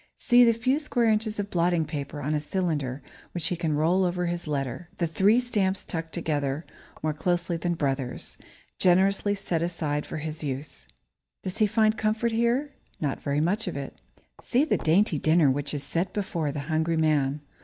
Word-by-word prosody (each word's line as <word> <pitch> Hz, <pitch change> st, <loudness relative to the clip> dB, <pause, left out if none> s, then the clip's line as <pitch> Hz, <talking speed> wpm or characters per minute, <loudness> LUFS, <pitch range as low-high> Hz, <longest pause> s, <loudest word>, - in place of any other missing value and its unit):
See 245 Hz, -1 st, +5 dB
the 235 Hz, -, +6 dB
few 255 Hz, +5 st, +1 dB
square 250 Hz, -6 st, 0 dB
inches 215 Hz, 0 st, 0 dB
of 205 Hz, 0 st, -3 dB
blotting 170 Hz, -1 st, +2 dB
paper 145 Hz, -1 st, -5 dB
on 150 Hz, +3 st, 0 dB
a 150 Hz, -, 0 dB
cylinder 150 Hz, -6 st, -2 dB, 0.3 s
which 170 Hz, -3 st, -1 dB
he 180 Hz, -, 0 dB
can 165 Hz, -3 st, -1 dB
roll 170 Hz, +5 st, +3 dB
over 180 Hz, 0 st, 0 dB
his 175 Hz, -1 st, -3 dB
letter 140 Hz, +3 st, -3 dB
the 170 Hz, -, +1 dB
three 195 Hz, +8 st, +3 dB
stamps 205 Hz, -6 st, 0 dB
stuck 165 Hz, -2 st, -4 dB
together 150 Hz, -3 st, -2 dB, 0.4 s
more 155 Hz, -1 st, +1 dB
closely 175 Hz, +2 st, 0 dB
than 170 Hz, +1 st, -1 dB
brothers, 135 Hz, -4 st, -2 dB, 0.4 s
generously 195 Hz, +3 st, +3 dB
set 185 Hz, -5 st, -2 dB
aside 155 Hz, -4 st, -2 dB
for -, -, -5 dB
his 155 Hz, 0 st, -5 dB
use. 135 Hz, -, -5 dB, 0.6 s
Does 185 Hz, +4 st, -4 dB
he 215 Hz, -, +5 dB
find 215 Hz, +1 st, +2 dB
comfort 220 Hz, +2 st, +1 dB
here? 235 Hz, +5 st, +1 dB, 0.3 s
Not 145 Hz, -3 st, -2 dB
very 145 Hz, +1 st, 0 dB
much 195 Hz, +7 st, 0 dB
of -, -, -3 dB
it. 140 Hz, -1 st, -6 dB, 0.5 s
See 255 Hz, +5 st, +2 dB
the -, -, +1 dB
dainty 165 Hz, -1 st, +2 dB
dinner 155 Hz, -2 st, +4 dB
which 140 Hz, +1 st, -2 dB
is 145 Hz, -2 st, -3 dB
set 170 Hz, +6 st, -2 dB
before 170 Hz, -7 st, -2 dB
the 145 Hz, 0 st, -4 dB
hungry 160 Hz, +2 st, 0 dB
man. 150 Hz, -2 st, +2 dB
170 Hz, 185 wpm, -27 LUFS, 150-200 Hz, 0.6 s, the